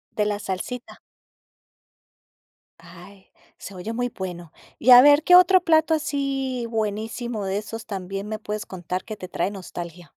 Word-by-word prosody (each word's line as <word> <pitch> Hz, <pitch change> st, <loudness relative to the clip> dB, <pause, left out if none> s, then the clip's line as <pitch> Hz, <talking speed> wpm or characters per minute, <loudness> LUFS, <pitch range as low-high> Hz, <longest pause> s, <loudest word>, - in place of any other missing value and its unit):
De 210 Hz, -, +1 dB
la 205 Hz, -1 st, -2 dB
salsita. 210 Hz, +6 st, -6 dB, 1.8 s
Ay, 180 Hz, +3 st, -15 dB, 0.3 s
se 195 Hz, -, -10 dB
oye 185 Hz, +5 st, -6 dB
muy 245 Hz, +1 st, -1 dB
bueno. 175 Hz, -5 st, -8 dB, 0.3 s
Y 250 Hz, -, +4 dB
a 245 Hz, 0 st, +11 dB
ver, 290 Hz, +2 st, +6 dB
¿qué 360 Hz, -, +6 dB
otro 365 Hz, 0 st, +7 dB
plato 320 Hz, -2 st, +3 dB
así 275 Hz, -5 st, -2 dB
buenísimo 220 Hz, +1 st, -3 dB
de 190 Hz, +1 st, -1 dB
esos 225 Hz, +2 st, -7 dB
también 195 Hz, 0 st, -5 dB
me 215 Hz, 0 st, -5 dB
puedes 210 Hz, -1 st, -5 dB
contar 185 Hz, 0 st, -5 dB
que 215 Hz, -1 st, -8 dB
te 185 Hz, -, -8 dB
trae 190 Hz, -, -2 dB
nostalgia? 175 Hz, -3 st, -8 dB
215 Hz, 155 wpm, -23 LUFS, 190-250 Hz, 1.8 s, a